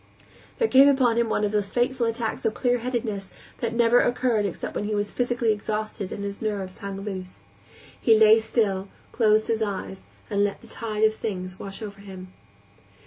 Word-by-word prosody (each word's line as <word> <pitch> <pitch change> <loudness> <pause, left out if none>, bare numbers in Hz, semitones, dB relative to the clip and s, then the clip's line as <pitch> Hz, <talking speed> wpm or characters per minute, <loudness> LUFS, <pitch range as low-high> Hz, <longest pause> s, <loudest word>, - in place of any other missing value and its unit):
There 460 - +2
came 270 -6 +7
upon 260 -5 +3
him 235 -1 +1
one 210 - 0
of 205 - +1
those 205 -2 -1
fateful 245 0 +1
attacks 230 -1 -3
of 220 - 0
clearheadedness 240 -5 -1 0.3
that 235 -1 -2
never 235 +1 +5
occurred 240 -4 +1
except 185 - -5
when 205 - -2
he 210 0 -1
was 205 0 -1
physically 240 -2 +1
exhausted 215 -1 -4
and 200 - -5
his 200 0 -5
nerves 200 -4 -3
hung 195 -1 -6
loose. 185 -3 -7 0.6
He 225 -2 +5
lay 220 +1 +7
still, 205 -4 0 0.2
closed 215 -2 +3
his 225 -1 0
eyes, 195 -2 -4 0.2
and 205 -1 +1
let 205 -1 -1
the 235 - -15
tide 220 -2 -3
of 220 0 +5
things 185 -4 -5
wash 195 +3 -7
over 200 -2 -8
him. 185 -2 -10
215 Hz, 185 wpm, -25 LUFS, 200-235 Hz, 0.6 s, came